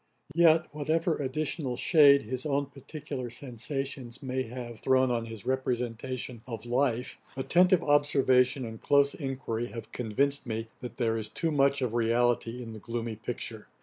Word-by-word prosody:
Yet, 165 0 +5
whatever 160 +3 0
additional 140 -1 -2
shade 145 -4 +6
his 125 +3 -4
own 140 -1 0
particular 140 -1 -7
sensations 130 +1 -5
may 130 0 -1
have 120 -2 -7
thrown 130 -1 +3
on 115 -1 -1
his 110 -3 -8
representation 125 -1 -2
of 115 -2 -6
life, 125 0 0 0.2
attentive 180 +6 +4
observation 135 -3 +3
and 110 -1 -8
close 140 0 +4
enquiry 130 -5 -3
have 115 -2 -8
convinced 135 +5 -1
me, 115 0 -3
that 125 - -8
there 115 -3 +1
is 110 -1 -3
too 165 +7 -1
much 140 -1 +3
of 120 -3 -1
reality 120 +1 +1
in 115 -1 -8
the 110 - -8
gloomy 115 +1 -4
picture. 110 0 -5
130 Hz, 150 wpm, -29 LUFS, 115-140 Hz, 0.2 s, shade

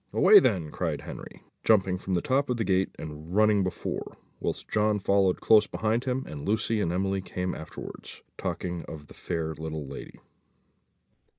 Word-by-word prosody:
"Away 425 - +8
then," 85 - +1
cried - - -2
Henry, - - -9 0.2
jumping 95 -4 +3
from 95 0 -2
the 85 - 0
top 135 +1 +1
of 125 - 0
the 115 - 0
gate, 95 -2 +2
and 80 +3 -7
running 105 -1 +5
before, 95 - -4 0.2
whilst - - -3
John 105 0 +2
followed 100 -1 +2
close 105 -2 +6
behind 115 +3 -1
him, 130 0 -1
and 75 -2 -7
Lucy 110 +1 0
and 85 - 0
Emily 95 +2 0
came 90 0 -3
afterwards, 80 - -8
talking 90 -2 -3
of 75 -2 -9
the - - -14
fair 80 -1 -3
little 80 -1 -5
lady. 70 +1 -9
95 Hz, 170 wpm, -28 LUFS, 85-110 Hz, 0.2 s, Away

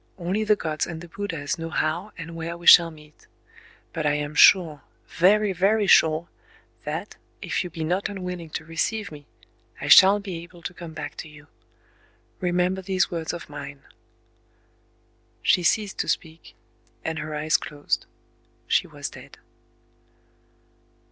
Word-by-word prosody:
"Only 190 +4 -1
the 210 0 +3
Gods 155 -5 -3
and 165 -2 -6
the 175 - -10
Buddhas 165 -4 -4
know 165 0 -5
how 165 +6 -2
and 165 0 -8
where 165 +1 -5
we 175 - -13
shall 170 -1 +9
meet. 150 -1 -17 0.7
But 160 -2 -3
I 145 - +2
am 150 0 -3
sure—very, 185 +5 +3
very 200 +4 +2
sure—that, 160 -2 0 0.3
if - - -1
you 180 - -6
be 165 -2 -6
not 180 +5 -1
unwilling 180 -4 -6
to 155 - -6
receive 200 +6 -2
me, 145 -2 -12 0.5
I - - -5
shall 195 +2 +8
be 190 -5 -6
able 175 0 -15
to 180 - -5
come 170 -2 -10
back 155 - -7
to 160 - -8
you... 150 -1 -15 0.9
Remember 180 +1 0
these 190 0 0
words 165 -2 -3
of 175 - -8
mine."... 145 -1 -9 1.6
She 180 - +4
ceased 205 +3 0
to - - -1
speak; 160 0 -4 0.5
and 160 0 -2
her 155 0 -5
eyes 155 +1 +2
closed. 145 -1 -3 0.6
She - - +2
was - - -6
dead. - - -13
170 Hz, 150 wpm, -24 LUFS, 155-185 Hz, 1.6 s, shall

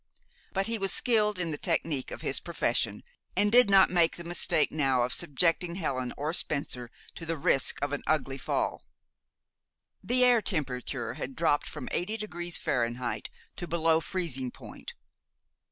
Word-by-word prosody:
But 195 0 0
he 230 0 -2
was 195 0 +1
skilled 210 -4 +2
in 170 -3 -2
the 145 - -3
technic 160 -6 -1
of - - -7
his - - +1
profession, - - -1 0.3
and 205 0 +3
did 245 -2 +6
not 195 -2 +6
make 170 -2 +3
the 170 - -7
mistake 170 -2 +2
now 135 -5 +2
of 125 - 0
subjecting 170 +4 +2
Helen 130 -8 -2
or 150 +3 -2
Spencer 135 -7 -1 0.2
to - - -9
the 165 0 -2
risk 135 -1 +2
of 145 0 -1
an 145 - -2
ugly 135 -3 0
fall. - - -1 1.2
The 250 +1 +2
air 245 -2 +5
temperature 130 - -3
had 130 0 -6
dropped 160 -3 +1
from 125 - -7
eighty 210 +5 -1
degrees 175 -5 -3
Fahrenheit 120 0 -2 0.3
to 175 - -5
below 165 -1 +3
freezing 145 -6 -2
point. - - -10
165 Hz, 160 wpm, -29 LUFS, 135-185 Hz, 1.2 s, did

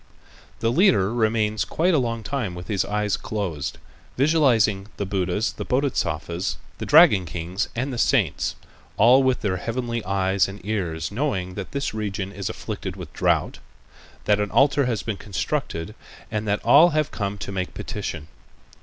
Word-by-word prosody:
The 115 - +2
leader 135 - +3
remains 110 -2 +1
quiet 175 +3 +1
a 155 - +4
long 115 -2 -2
time 110 -6 -3
with 90 +3 -9
his 100 -3 +1
eyes 105 -1 0
closed, 90 -10 -4 0.4
visualizing 125 -9 +3
the 100 - -2
Buddhas, 95 +2 -1
the - - -6
Bodhisattvas, 90 - -1 0.2
the - - -4
dragon 145 - +6
kings, 85 +4 -3
and 130 +3 -2
the 120 - -4
saints, 100 - +1 0.4
all 125 +5 +6
with 130 -2 +1
their 95 -5 0
heavenly 115 +3 -3
eyes 95 0 +1
and 100 +1 -8
ears 85 -7 -2
knowing 100 -7 -2
that 100 -1 -6
this 140 -4 -2
region 100 -2 -3
is 100 -2 -4
afflicted - - -5
with - - -9
drought, - - 0 0.7
that 105 0 +3
an 105 -1 -1
altar 140 +2 +3
has 115 -5 -1
been 110 -3 -3
constructed 85 0 -3 0.4
and 110 0 -2
that 100 0 -1
all 145 +9 +7
have 155 -2 0
come 100 -1 -3
to 100 - -6
make 95 -2 -4
petition. 75 - -5
105 Hz, 165 wpm, -24 LUFS, 95-125 Hz, 0.7 s, all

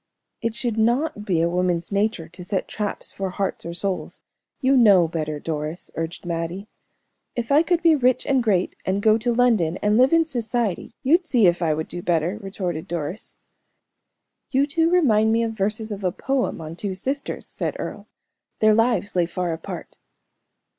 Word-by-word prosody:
"It 230 -2 -2
should 235 -2 -2
not 240 +2 +1
be 175 -6 +1
a - - +3
woman's 175 0 0
nature 200 -4 0
to 175 +2 -11
set 190 +1 -2
traps 210 -1 -4
for 195 -1 -3
hearts 190 -2 -3
or 170 - -5
souls. 180 -3 -3 0.4
You 270 0 +3
know 200 -9 +6
better, 155 -2 -3
Doris," 155 +2 -5
urged 165 +3 -5
Mattie. 170 +4 -3 0.7
"If 240 +1 -3
I 290 +2 +6
could 340 0 +1
be 330 -1 +6
rich 255 -4 +2
and 270 -2 +2
great, 195 -6 +1
and 195 +2 -1
go 220 0 +5
to 240 +2 0
London, 225 -9 +2
and 210 +2 +2
live 255 +2 +5
in 330 0 +4
society, 235 - -2
you'd 335 +6 +3
see 240 -8 +4
if 175 0 +3
I 160 -3 +2
would 160 +1 -3
do 175 - -6
better," 175 +4 0
retorted 185 -4 -4
Doris. 170 +3 -5 1.1
"You 275 +1 +3
two 325 +3 +1
remind 225 -12 +4
me 230 +1 +2
of 225 - -1
verses 215 +1 -2
of 200 -1 -5
a 180 - +1
poem 265 -4 -1
on 160 +1 -7
two 190 +1 -4
sisters," 270 +9 -3
said - - -3
Earle. - - -6 0.5
"Their 215 0 +5
lives 225 -3 +1
lay 175 -2 +2
far 175 -1 -2
apart. 160 - -8
205 Hz, 180 wpm, -23 LUFS, 175-240 Hz, 1.1 s, know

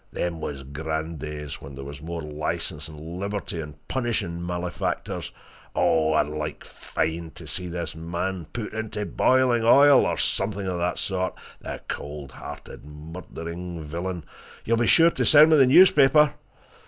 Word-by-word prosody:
Them 85 -2 -3
was 70 -3 -5
grand 80 +3 -4
days 75 -1 -6
when 70 0 -9
there 70 - -7
was 70 +1 -8
more 85 0 -5
licence 75 0 -3
and 75 -1 -11
liberty 90 +3 -4
in 75 -2 -7
punishing 105 -9 -2
malefactors 90 0 -3 0.4
oh! 80 -1 +3
I'd 75 - +3
like 75 +1 -5
fine 80 +1 -3
to - - -10
see 90 - -5
this 85 0 -4
man 85 +1 -4
put 115 -3 -5
into 110 -1 -3
boiling 125 0 +3
oil, 140 +4 +7
or - - -1
something 100 0 0
of 90 -2 -2
that 90 0 -1
sort, 95 -1 -1 0.2
the - - -7
cold 70 -1 -6
hearted, - - -10
murdering 85 +2 -7
villain! 85 +2 -4 0.4
You'll 115 +1 +2
be 120 0 +2
sure 165 0 +6
to - - -1
send 155 +1 +7
me 155 - +7
the 135 -2 +6
newspaper?" 150 -1 +6
85 Hz, 155 wpm, -25 LUFS, 75-105 Hz, 0.4 s, oil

